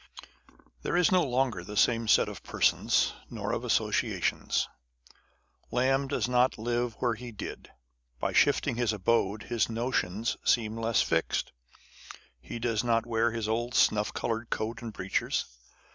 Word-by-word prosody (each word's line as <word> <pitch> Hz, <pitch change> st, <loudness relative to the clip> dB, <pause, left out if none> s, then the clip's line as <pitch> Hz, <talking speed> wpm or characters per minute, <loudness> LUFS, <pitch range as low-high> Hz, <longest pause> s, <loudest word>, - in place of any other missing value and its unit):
There 175 Hz, -, -1 dB
is 180 Hz, +1 st, +4 dB
no 185 Hz, -1 st, +5 dB
longer 125 Hz, -8 st, 0 dB
the 105 Hz, +3 st, -7 dB
same 115 Hz, 0 st, +3 dB
set -, -, +5 dB
of -, -, -7 dB
persons, -, -, +2 dB, 0.2 s
nor -, -, -4 dB
of -, -, -1 dB
associa -, -, 0 dB
tions. -, -, 0 dB, 1.0 s
Lamb 135 Hz, +2 st, +1 dB
does 135 Hz, -, -1 dB
not 125 Hz, +1 st, +2 dB
live 120 Hz, +1 st, -1 dB
where 120 Hz, +1 st, 0 dB
he 120 Hz, +2 st, -8 dB
did. 105 Hz, -, -8 dB, 0.5 s
By -, -, -1 dB
shifting -, -, +3 dB
his 120 Hz, -3 st, +1 dB
abode, 105 Hz, 0 st, +1 dB
his 120 Hz, -1 st, 0 dB
notions 115 Hz, -3 st, -1 dB
seem 110 Hz, -2 st, +2 dB
less 115 Hz, -1 st, +2 dB
fixed. 80 Hz, -1 st, 0 dB, 0.9 s
He 65 Hz, -, -7 dB
does 115 Hz, -1 st, 0 dB
not 115 Hz, -1 st, +1 dB
wear 115 Hz, 0 st, +1 dB
his 115 Hz, -1 st, -3 dB
old 120 Hz, +2 st, -1 dB
snuff 105 Hz, 0 st, +3 dB
coloured 115 Hz, 0 st, -3 dB
coat 115 Hz, +2 st, -3 dB
and 115 Hz, -2 st, -6 dB
breeches. 95 Hz, -2 st, -1 dB
115 Hz, 150 wpm, -29 LUFS, 110-120 Hz, 1.0 s, no